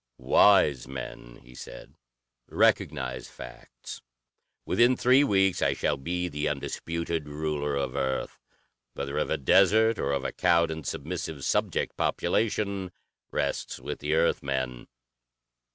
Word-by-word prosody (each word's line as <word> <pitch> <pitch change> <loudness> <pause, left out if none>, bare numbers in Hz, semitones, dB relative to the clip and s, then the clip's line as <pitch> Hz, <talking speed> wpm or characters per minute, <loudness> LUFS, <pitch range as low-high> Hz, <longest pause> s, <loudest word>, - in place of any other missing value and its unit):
"Wise 75 -11 +4
men," 60 -2 -8
he 60 +1 -16
said, - - -11 0.5
"recognize 65 -4 0
facts. - - -11 0.6
Within 120 +1 +3
three 130 +3 +5
weeks 95 -7 +2
I 70 0 +2
shall 75 - 0
be 90 +6 -3
the 75 -3 -2
undisputed 80 +2 -3
ruler 75 -1 -2
of 70 -2 -2
Earth. 65 0 -2 0.6
Whether 70 0 -3
of - - -1
a - - 0
desert 110 - +4
or 70 - -1
of 70 -1 -1
a - - -1
cowed 85 -2 +2
and 80 -1 -6
submissive 80 -3 -5
subject - - 0
population, 100 -4 -1 0.4
rests - - -2
with - - -6
the 75 +2 -1
Earth 85 +1 +2
men. 65 -3 -3
75 Hz, 130 wpm, -27 LUFS, 70-90 Hz, 0.6 s, three